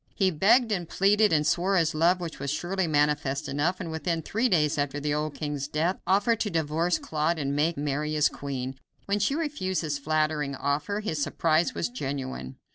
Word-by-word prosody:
He 190 -2 +2
begged 225 - +4
and 175 -5 -2
pleaded 205 +2 +3
and 150 -2 +2
swore 190 +5 +2
his 165 -3 +2
love, 170 +4 +3
which 170 -2 -6
was 140 - -3
surely 175 +5 -1
manifest 145 -2 +1
enough, 150 +6 0
and 165 - -5
within 165 0 -2
three 230 +9 0
days 150 -4 +2
after 145 0 -1
the 145 0 -1
old 150 0 -2
king's 145 -2 -3
death 160 +5 0
offered 205 +4 +3
to 215 - 0
divorce 165 +1 0
Claude 155 +2 -1
and 140 -2 -2
make 160 +3 +1
Mary 150 +1 -2
his 150 -1 +4
queen. 135 -1 -5 0.3
When 200 +1 0
she 240 +7 +1
refused 285 - -2
this 150 -2 -2
flattering 155 -1 0
offer 145 +10 -1
his 160 -8 -2
surprise 165 - +1
was - - -1
genuine. 135 - -5
155 Hz, 195 wpm, -27 LUFS, 145-185 Hz, 0.3 s, begged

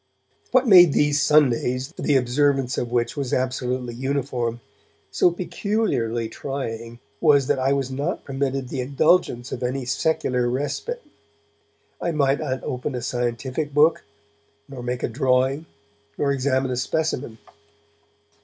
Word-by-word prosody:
What 255 0 +3
made 175 -7 +8
these 145 -1 +2
Sundays, 135 -1 +2
the 145 - 0
observance 135 +1 +2
of 120 - -3
which 120 -1 0
was 140 -4 -3
absolutely 125 -1 -1
uniform, 125 -2 -2 0.5
so - - +4
peculiarly 175 - -1
trying 115 -2 -5 0.2
was 145 -4 +4
that 145 0 +1
I 135 +1 +2
was 135 -1 -1
not 140 +2 -3
permitted 135 -1 -2
the 130 - -3
indulgence 135 -1 +1
of 120 - -5
any 130 +1 -2
secular 125 -2 0
respite. 145 - -3 1.0
I 170 - -1
might 140 -2 +2
not 130 -4 -3
open 125 +2 -3
a 125 - -4
scientific 130 +4 -3
book, 155 +2 +4 0.6
nor 135 -3 -8
make 125 +1 -3
a - - +2
drawing, 130 +4 +1 0.5
nor 140 -1 +1
examine 130 -1 0
a 125 - -2
specimen. 130 -4 -2
135 Hz, 135 wpm, -23 LUFS, 125-145 Hz, 1.0 s, made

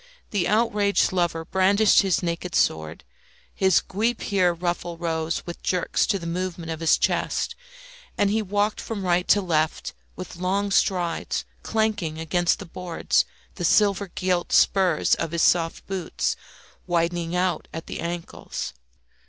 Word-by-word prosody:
The 200 -5 +1
outraged 210 -2 +2
lover 170 -3 0
brandished 195 +4 +4
his 190 -3 +1
naked 170 +1 -3
sword; 80 -1 0 0.5
his 190 -2 +3
guipure 200 -3 0
ruffle 175 0 -3
rose 165 -1 -2
with 175 - -7
jerks 180 -2 0
to 205 - +1
the 170 - -8
movements 170 -1 -3
of 160 - -8
his 165 -1 +4
chest, - - 0 0.6
and 200 -1 +2
he 220 +1 +1
walked 205 +1 0
from 205 -4 -5
right 180 0 +1
to 205 - +5
left 160 -3 0 0.2
with 185 -1 -8
long 195 +3 0
strides, 180 -3 0 0.2
clanking 215 -8 -1
against 170 +2 +1
the 200 - -8
boards 175 0 0 0.3
the - - -6
silver 200 +2 +3
gilt 180 -1 -1
spurs 185 -5 +3
of 165 - -1
his 170 - +1
soft 165 -2 +2
boots, 190 -4 -2 0.5
widening 170 0 0
out 180 -3 0
at 165 - -6
the - - -6
ankles. 170 - -5
180 Hz, 145 wpm, -24 LUFS, 170-195 Hz, 0.6 s, to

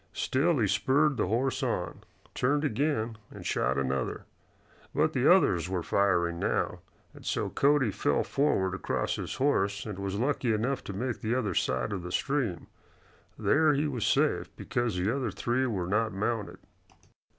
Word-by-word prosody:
Still 150 - +1
he 115 - +2
spurred 135 +9 +2
the 105 - +1
horse 125 +6 0
on, - - -2 0.3
turned 145 +4 +1
again 120 -4 -1
and - - -11
shot 65 - 0
another. 65 -1 -2 0.7
But - - +2
the - - +4
others 85 0 +3
were 90 -2 -2
firing 85 -4 +1
now, - - -1 0.3
and - - -14
so - - -1
Cody 140 -5 +3
fell - - +1
forward 95 -10 +1
across 95 - -2
his - - -4
horse 100 -8 +1
and 105 -3 -6
was 100 0 -3
lucky 125 0 0
enough 120 +5 -1
to 100 - -5
make 120 +5 -3
the 110 +3 0
other 110 -7 -1
side 65 -3 0
of 95 - -3
the 90 +1 -7
stream. 125 - -1 0.7
There 155 0 +3
he 150 +2 +1
was 125 -7 -3
safe, - - +2
because 120 -4 -2
the 100 +7 0
other 130 -4 -1
three 120 +7 0
were 95 -7 -2
not 105 +4 0
mounted. 105 +2 -2
110 Hz, 165 wpm, -29 LUFS, 95-135 Hz, 0.7 s, the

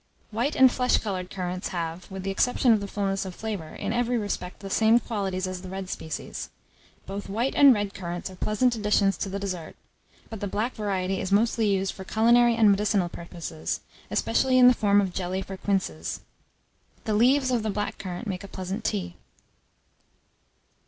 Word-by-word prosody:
White 235 +7 -1
and 260 -1 +7
flesh 250 0 +2
coloured 185 -4 -3
currants 180 0 -3
have, 170 0 -4
with 190 -1 -6
the 195 - -1
exception 245 +4 +3
of 215 - +2
the 200 - -5
fullness 195 -1 -1
of 185 -2 -7
flavour, 205 -8 -5
in 205 +2 -3
every 245 0 +1
respect, 200 -4 -4
the 195 - -6
same 225 +3 +5
qualities 195 -5 -2
as 185 -1 -5
the 185 - -8
red 190 0 -5
species. 160 -1 -5 0.6
Both 195 +1 -6
white 230 +7 0
and 280 -1 +8
red 205 -4 0
currants 175 -3 -5
are - - -11
pleasant 215 +6 +1
additions 210 -2 +2
to 195 - -3
the 195 - -3
dessert, 185 -5 -5 0.5
but 220 - -7
the 205 - -3
black 215 +6 -1
variety 195 -3 -1
is 190 - -4
mostly 225 +2 +3
used 195 -1 +1
for 190 - -8
culinary 235 +4 +4
and 220 -3 +5
medicinal 200 -2 +1
purposes, 170 -2 -5 0.3
especially 260 -1 +2
in 250 -1 +8
the 250 - +8
form 205 -3 +3
of 190 -3 -2
jelly 185 +1 -2
for 195 - -7
quinsies. 185 - -2 0.8
The 215 - -1
leaves 255 +4 +4
of 240 -2 +2
the 215 - -2
black 205 0 -3
currant 185 +4 -5
make 185 -2 -4
a - - -8
pleasant 190 0 -5
tea. 90 -4 -2
200 Hz, 185 wpm, -26 LUFS, 185-225 Hz, 0.8 s, and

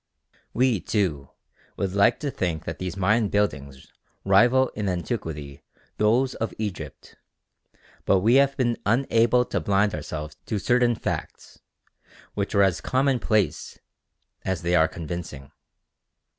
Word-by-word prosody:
We, 125 -4 +2
too, 85 - -1 0.5
would 95 -2 -2
like 100 +4 +3
to 145 -2 -2
think 85 - -3
that 80 - -5
these 95 0 -5
Mayan 105 +3 +2
buildings 70 -10 -2 0.4
rival 120 +7 +4
in 105 -2 -3
antiquity 75 -5 -4 0.4
those 120 +5 +2
of 115 - -4
Egypt; 90 -9 -6 0.9
but 95 - +3
we 115 +5 +3
have 140 0 0
been 120 -3 +1
unable 120 +1 +2
to 100 - -2
blind 100 +4 +1
ourselves 75 0 -6
to 110 - -1
certain 120 +3 +2
facts, - - -6 0.7
which 100 0 -3
are 100 - +5
as 90 -3 +1
commonplace 130 -6 0 0.7
as 95 -2 -2
they 85 +1 0
are 80 -2 +5
convincing. 80 -4 -7
100 Hz, 130 wpm, -25 LUFS, 85-115 Hz, 0.9 s, are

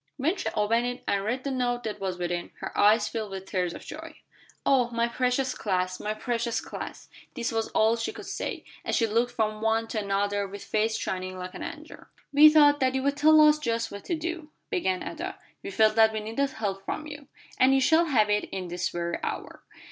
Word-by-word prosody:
When 320 +8 +1
she 375 - -2
opened 230 +3 +2
it 245 +1 -5
and 200 -1 +1
read 245 +5 -2
the 275 - -2
note 245 -2 -1
that 215 -2 -4
was 190 -2 -3
within, 175 0 -3
her - - -6
eyes 210 +1 +4
filled 220 -2 -4
with 190 -1 -7
tears 180 -3 -2
of - - -10
joy. 320 +1 -9 0.5
"Oh, 255 -3 +3
my 235 0 0
precious 255 +2 0
class! 185 -2 -1
My 210 +1 -3
precious 235 +1 -1
class!" - - -8 0.3
This 240 -3 -2
was 225 -1 -1
all 220 +1 +4
she 230 - -2
could - - -10
say, - - -4 0.2
as - - -1
she 230 - +3
looked 230 +3 +1
from 215 -2 -1
one 225 0 +1
to 220 - -2
another 200 0 0
with 200 +1 -9
face 220 +1 0
shining 185 -2 -4
like 185 0 -6
an - - -8
angel's. 320 -1 -8 0.3
"We 300 +2 +9
thought 290 -1 +6
that 260 0 +1
you'd 275 +2 +1
tell 310 +2 +6
us 300 0 +6
just 230 -5 -1
what 200 0 -8
to 345 - -1
do," 325 -1 -5 0.2
began 190 - 0
Ada. 350 +4 -5 0.2
"We - - -6
felt 220 - +4
that 220 0 +6
we 215 - -1
needed 225 +6 -1
help 200 -6 -4
from 310 - -4
you." 290 -2 -9 0.3
"And 265 +1 +5
you - - +4
shall 320 +6 +4
have 220 -9 +2
it 210 0 0 0.2
this 175 +1 -2
very 170 0 -3
hour. - - -5
230 Hz, 215 wpm, -27 LUFS, 205-275 Hz, 0.5 s, We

